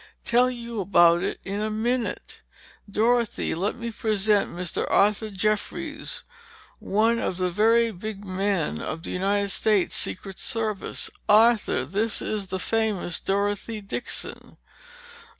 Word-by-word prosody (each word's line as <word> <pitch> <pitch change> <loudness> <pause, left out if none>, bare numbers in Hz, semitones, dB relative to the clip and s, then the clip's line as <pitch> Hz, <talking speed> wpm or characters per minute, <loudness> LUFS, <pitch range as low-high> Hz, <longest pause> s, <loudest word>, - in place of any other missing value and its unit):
Tell 245 +2 +4
you 235 -3 -5
about 175 -3 +5
it - - -2
in 200 +2 -3
a 215 - 0
minute. 235 +3 -2 0.5
Dorothy, 230 +2 +1
let 190 +6 -1
me 235 -1 -5
present 210 -2 +1
Mr. 175 0 -3
Arthur 210 +2 +3
Jeffries, 215 - -2 0.6
one 225 +3 +2
of 180 - -2
the 185 -1 0
very 225 +5 +3
big 205 +1 -7
men 185 - -1
of 160 - -5
the - - -5
United 200 +2 0
States 210 -3 +2
Secret 190 0 -4
Service. 220 -3 -2 0.2
Arthur, 215 - +4
this 205 - -1
is 210 -3 -3
the 190 - -3
famous 210 -4 -1
Dorothy 205 +2 -1
Dixon!" 205 +4 -5
210 Hz, 130 wpm, -25 LUFS, 195-225 Hz, 0.6 s, about